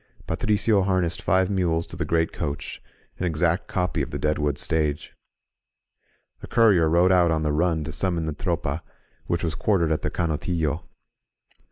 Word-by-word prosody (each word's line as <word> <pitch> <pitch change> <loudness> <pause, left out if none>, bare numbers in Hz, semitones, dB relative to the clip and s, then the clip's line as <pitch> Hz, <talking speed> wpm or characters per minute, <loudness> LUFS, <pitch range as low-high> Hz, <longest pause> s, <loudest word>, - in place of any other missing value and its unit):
Patricio 105 0 +1
harnessed 95 -3 0
five 95 +1 +2
mules 85 -4 0
to - - -10
the 85 -1 -2
great 80 +1 +1
coach, 75 -3 -4 0.2
— - - -35
an 90 - -1
exact 85 +2 0
copy 90 -2 -1
of - - -3
the - - -4
Deadwood 75 -1 0
Stage. 75 -2 -1 1.3
A - - -8
courier 100 -9 +4
rode 85 +3 +4
out 90 -2 +4
on 80 -1 0
the 75 -1 0
run 80 0 +1
to 80 - -5
summon 85 -1 -1
the 80 - -2
Tropa, 85 -3 -2 0.5
which 85 0 -1
was 80 -2 -1
quartered 85 -6 +1
at 80 - 0
the - - -1
CanotUlo. 80 -1 -1
85 Hz, 170 wpm, -24 LUFS, 80-90 Hz, 1.3 s, courier